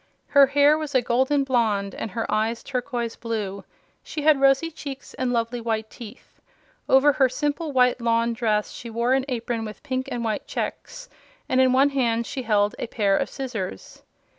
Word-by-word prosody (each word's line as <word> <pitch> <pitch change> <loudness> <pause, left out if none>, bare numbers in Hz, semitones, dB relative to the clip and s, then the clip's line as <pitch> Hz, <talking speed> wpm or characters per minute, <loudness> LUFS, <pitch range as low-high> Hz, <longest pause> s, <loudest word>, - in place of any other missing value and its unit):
Her 280 -1 +6
hair 285 +2 +4
was 300 -3 -5
a 255 - +5
golden 265 +4 +2
blonde 220 -7 0
and - - -5
her 225 +4 -3
eyes 220 +2 0
turquoise 245 -3 -3
blue. 210 -4 -4 0.4
She 300 - -6
had 300 -3 +4
rosy 275 +4 +3
cheeks 280 -3 -8
and 255 -1 -2
lovely 235 0 -1
white 220 -1 -2
teeth. 235 +1 -13 0.5
Over 270 +2 +6
her 265 -1 +3
simple 295 +4 -2
white 250 -2 +3
lawn 230 0 +1
dress 215 -3 0
she 235 - -8
wore 235 +3 0
an 265 0 +1
apron 235 -3 -3
with 215 -1 -8
pink 260 -3 -3
and 240 -1 -3
white 215 -2 -2
checks, - - -5 0.4
and 260 0 +3
in 260 -1 +4
one 270 +2 +4
hand 235 -4 0
she 265 - -5
held 210 -3 +1
a - - -3
pair 205 -4 +1
of 275 - -1
scissors. 225 - -6
245 Hz, 185 wpm, -24 LUFS, 225-270 Hz, 0.5 s, Her